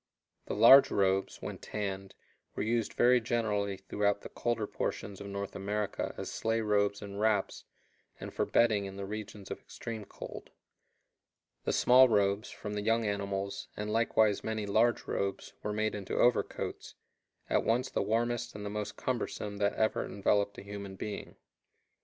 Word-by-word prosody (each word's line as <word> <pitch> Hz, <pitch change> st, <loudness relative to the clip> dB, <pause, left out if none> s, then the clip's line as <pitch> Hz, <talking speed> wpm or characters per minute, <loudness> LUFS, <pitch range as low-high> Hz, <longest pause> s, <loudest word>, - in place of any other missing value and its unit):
The -, -, -2 dB
large 120 Hz, +6 st, +9 dB
robes, 95 Hz, 0 st, +1 dB
when -, -, -5 dB
tanned, 95 Hz, -2 st, -4 dB, 0.4 s
were -, -, -1 dB
used 115 Hz, +1 st, 0 dB
very 125 Hz, 0 st, +5 dB
generally 105 Hz, -4 st, 0 dB
throughout 100 Hz, +1 st, 0 dB
the -, -, -8 dB
colder 120 Hz, -3 st, -1 dB
portions 100 Hz, -1 st, -4 dB
of 100 Hz, -, -6 dB
North 100 Hz, 0 st, -5 dB
America 100 Hz, +1 st, -2 dB
as -, -, -5 dB
sleigh 115 Hz, 0 st, 0 dB
robes 100 Hz, -1 st, +1 dB
and 100 Hz, 0 st, -7 dB
wraps, 105 Hz, -2 st, +1 dB, 0.5 s
and -, -, -7 dB
for -, -, 0 dB
bedding 110 Hz, -4 st, +3 dB
in 95 Hz, 0 st, -7 dB
the 100 Hz, 0 st, -5 dB
regions 105 Hz, -1 st, -7 dB
of -, -, -4 dB
extreme 110 Hz, -3 st, -7 dB
cold. -, -, -9 dB, 1.2 s
The -, -, +1 dB
small 130 Hz, +1 st, +6 dB
robes, 100 Hz, -1 st, +2 dB
from 105 Hz, -, -6 dB
the 105 Hz, -, -2 dB
young 115 Hz, +2 st, +2 dB
animals, 100 Hz, -1 st, -2 dB
and 105 Hz, +1 st, -3 dB
likewise 110 Hz, -2 st, +3 dB
many 110 Hz, -1 st, -2 dB
large 110 Hz, +4 st, +2 dB
robes, 100 Hz, 0 st, -3 dB
were 105 Hz, -, -2 dB
made 110 Hz, +1 st, 0 dB
into 100 Hz, -2 st, -4 dB
overcoats, 120 Hz, -1 st, 0 dB, 0.5 s
at -, -, +2 dB
once 120 Hz, +3 st, +1 dB
the -, -, 0 dB
warmest 120 Hz, +3 st, 0 dB
and 105 Hz, -1 st, -6 dB
the 100 Hz, -, -4 dB
most 105 Hz, 0 st, -4 dB
cumbersome 105 Hz, -4 st, -3 dB
that 100 Hz, 0 st, +1 dB
ever 110 Hz, 0 st, +1 dB
enveloped 100 Hz, 0 st, 0 dB
a -, -, -8 dB
human 100 Hz, -1 st, -7 dB
being. 105 Hz, +2 st, -6 dB
105 Hz, 165 wpm, -31 LUFS, 100-110 Hz, 1.2 s, large